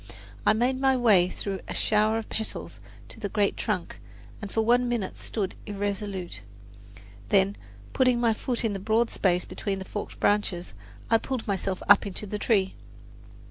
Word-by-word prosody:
I - - +7
made 250 +4 +1
my 265 -1 +3
way 205 -7 +5
through 195 0 -4
a - - -5
shower 215 +1 +3
of 225 - -4
petals 220 - -4 0.3
to - - -12
the 205 -3 -3
great 205 0 +1
trunk - - -3 0.4
and 205 -2 -6
for 225 - +1
one 240 +2 +3
minute 230 -6 -2
stood 200 -4 -3
irresolute; 200 - -4 0.9
then, 200 0 +3 0.4
putting 255 -2 +3
my 230 -2 +3
foot 240 +2 -1
in 215 - 0
the 195 - -3
broad 220 +4 +1
space 180 -2 +1
between 195 -2 -3
the 190 - -6
forked 205 - -6
branches, 195 - +1 0.4
I 225 - +6
pulled 260 -2 -4
myself 195 -2 -2
up 205 0 +6
into 200 +2 -5
the 210 +1 -4
tree. 195 -5 +2
210 Hz, 170 wpm, -27 LUFS, 195-230 Hz, 0.9 s, I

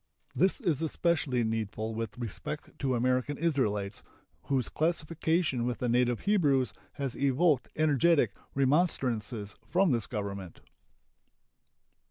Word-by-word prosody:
This 190 +7 +2
is 170 - 0
especially 155 -6 +1
needful 110 0 -2
with 115 -1 -4
respect 125 +6 -5
to 130 -2 0
American 130 +3 +1
Israelites, 105 -11 0 0.4
whose 130 -4 +1
classification 160 -3 0
with 120 0 -1
the 125 - -2
native 120 0 +2
Hebrews 145 -11 +2 0.2
has 140 -3 -3
evoked 140 +1 +2
energetic 150 -5 +3 0.2
remonstrances 130 - +1
from 180 -1 +3
this 115 -5 0
Government. 100 -4 -5
130 Hz, 110 wpm, -30 LUFS, 115-155 Hz, 0.4 s, energetic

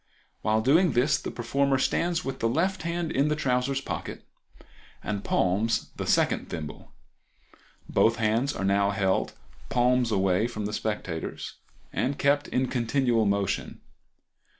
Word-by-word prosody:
While 110 +1 +2
doing 155 +6 +4
this 140 +5 +2
the - - -5
performer 135 +3 0
stands 170 +5 0
with 135 -1 -4
the 115 - +1
left 175 +10 0
hand 170 0 -2
in 140 +2 +2
the 150 - +1
trousers 135 -1 0
pocket - - -6 0.8
and 100 -2 -3
palms 100 +5 +1
the - - -4
second - - +1
thimble. 75 -4 -7 1.0
Both 115 - +3
hands 115 +4 +1
are 95 - -2
now 100 +1 +3
held 95 -2 0 0.4
palms 125 -1 +2
away 95 +1 +2
from 110 -3 -5
the 105 - -4
spectators, 100 -7 -4 0.4
and 135 +2 -1
kept 145 +1 +2
in 130 +1 0
continual 120 -2 +1
motion. 100 -1 -1
120 Hz, 140 wpm, -27 LUFS, 105-140 Hz, 1.0 s, doing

